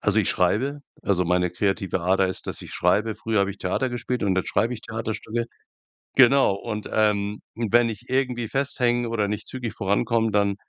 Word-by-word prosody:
also 105 +1 +2
ich 105 - +3
schreibe, 120 +11 +1 0.2
also 90 -3 +1
meine 90 +1 +1
kreative 95 +1 -1
Ader 95 +2 +3
ist, 95 - -3
dass - - -3
ich - - -10
schreibe. 105 +5 +2
Früher 110 -1 -1
habe 100 - +1
ich 100 - -9
Theater 95 +8 -1
gespielt 120 0 -3
und 95 -2 +1
jetzt 95 - 0
schreibe 120 +3 +1
ich 110 - -8
Theaterstücke. 110 0 -3 0.7
Genau, 130 -4 +6
und, 105 +1 -5
ähm 105 -1 +1 0.2
und 115 -2 -3
wenn 120 0 +5
ich 115 +2 -7
irgendwie 125 -3 0
festhänge 125 -3 +1
oder 105 -3 0
nicht 105 0 -4
zügig 125 -4 -5
vorankomme, 115 +3 +1
dann 100 -1 +2
110 Hz, 190 wpm, -24 LUFS, 100-120 Hz, 0.7 s, Genau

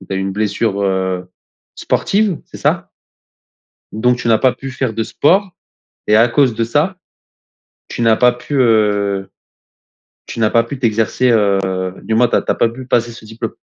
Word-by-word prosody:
tu 95 - -14
as - - -1
eu - - -2
une 95 0 -3
blessure, 105 0 -1
heu, 95 -2 -2 0.4
sportive, 200 -4 0
c'est - - -12
ça? - - -1 1.0
Donc 125 +3 +1
tu 120 - -4
n'as 115 -1 +4
pas 130 +2 +2
pu 135 0 -8
faire 130 -3 -2
de 115 +1 -1
sport 185 - +1 0.6
et 105 - +4
à 115 +2 +5
cause 130 -1 +2
de 115 - -1
ça, 150 +11 0 0.9
tu - - -6
n'as 115 -1 +4
pas 125 +2 +4
pu, 125 +4 -6
heu, 105 -4 +1 1.0
tu - - -7
n'as 110 -1 +2
pas 115 - +3
pu 130 +3 -7
t'exercer, 115 +1 +1
heu, 100 -4 +3 0.4
du 110 - -2
moins, 120 +2 +4
tu - - +1
as - - +1
tu - - -3
as - - -5
pas 115 - +2
pu 125 +3 -9
passer 120 -2 0
ce 115 - -13
diplôme? 110 +1 -6
115 Hz, 195 wpm, -16 LUFS, 105-125 Hz, 1.0 s, à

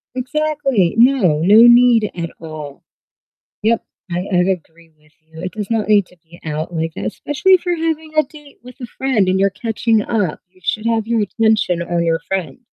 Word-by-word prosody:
Exactly. 270 - 0
No, 230 - +4
no 205 +6 +6
need 240 -3 +5
at 170 -1 -4
all. 155 -1 -9 0.8
Yep. 230 +1 +1 0.3
I 175 - -2
I - - +2
agree 170 -2 -2
with 150 0 -28
you. 160 +1 -14
It 185 - -5
does 210 0 -6
not 220 -2 -1
need 205 -3 +4
to 180 - -22
be 170 +1 -17
out 155 +2 -4
like 160 0 -2
that, - - -5
especially 295 - 0
if 360 - +1
you're 355 -1 0
having 320 -1 -3
a 310 - +4
date 295 0 -16
with 250 +2 -14
a 245 - -5
friend 235 -6 0
and 185 - +2
you're 195 +1 +2
catching 225 +1 0
up. 205 -8 -2
You 185 0 -27
should 215 +3 -2
have 225 -1 0
your 230 -1 0
attention 210 -4 +1
on 175 0 -1
your 165 0 +1
friend. 190 +1 -3
210 Hz, 200 wpm, -18 LUFS, 170-245 Hz, 0.8 s, no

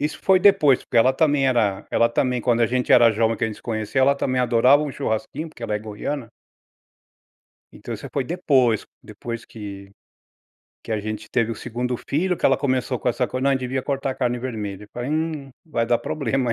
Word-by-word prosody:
isso 150 +2 -2
foi 190 -1 +5
depois, 180 -10 +5
porque - - -4
ela 130 +3 +5
também 145 -1 +2
era 110 -6 +1
ela 115 - +3
também, 125 +1 0
quando 120 -1 +1
a 115 - +4
gente 125 +2 0
era 120 -2 +7
jovem 110 +1 +1
que - - -1
a - - +1
gente 110 - -8
conheceu, 110 +3 -1
ela 140 +1 +4
também 130 -2 -1
adorava 125 +4 +4
um 150 - -3
churrasquinho, 135 +7 -3
porque 120 - -15
ela 110 -2 -2
é - - 0
goiana. 110 +5 -5 1.4
Então - - -8
isso - - -8
foi 135 -2 -1
depois, 130 - +1 0.2
depois 115 +2 -7
que 100 -3 -9 0.9
que 110 - -4
a 105 - -1
gente 110 +1 -6
teve 115 -2 +1
o 115 - -4
2º 125 +1 -3
filho 180 +5 -1
que - - 0
ela 135 - +4
começou 130 -2 -1
com 125 - -1
essa 125 +1 0
coisa, 130 +1 -4
não 140 - +3
devia 130 0 -2
cortar 135 -1 -2
a - - -6
carne 125 -1 -1
vermelha, 105 -5 -5
eu - - -29
falei: 120 +3 -4
'Hum, 155 -3 -2
vai 115 -8 -1
dar 120 0 +2
problema". 135 -4 -1
125 Hz, 210 wpm, -22 LUFS, 115-140 Hz, 1.4 s, era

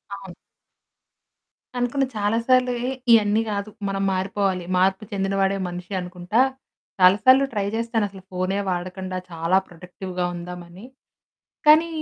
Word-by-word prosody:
అవును. 195 -3 -10 1.4
అనుకున్న 245 +3 +1
చాలా 205 +2 +1
సార్లు 255 -1 +4
ఎహ్! 265 - -1 0.2
ఇయన్నీ 215 -1 +5
కాదు, 200 0 -3 0.2
మనం 195 0 -1
మారిపోవాలి. 190 -1 -1
మార్పు 190 +2 +2
చెందిన 195 -1 -1
వాడే 195 0 +2
మనిషనుకుంటా. 180 +3 -2 0.6
చాలా 185 +2 +7
సార్లు 260 +2 +7
ట్రై 205 -2 -1
చేస్తాను. 230 -1 0
అసలు 190 -1 -13
ఫోనే 185 +2 -1
వాడకండా 185 +1 -4
చాలా 165 +3 +1
ప్రొడక్టివ్‌గా 180 +1 -6
ఉందామని. 175 +3 -9 0.8
కానీ 315 +2 +7
195 Hz, 120 wpm, -23 LUFS, 180-215 Hz, 1.4 s, చాలా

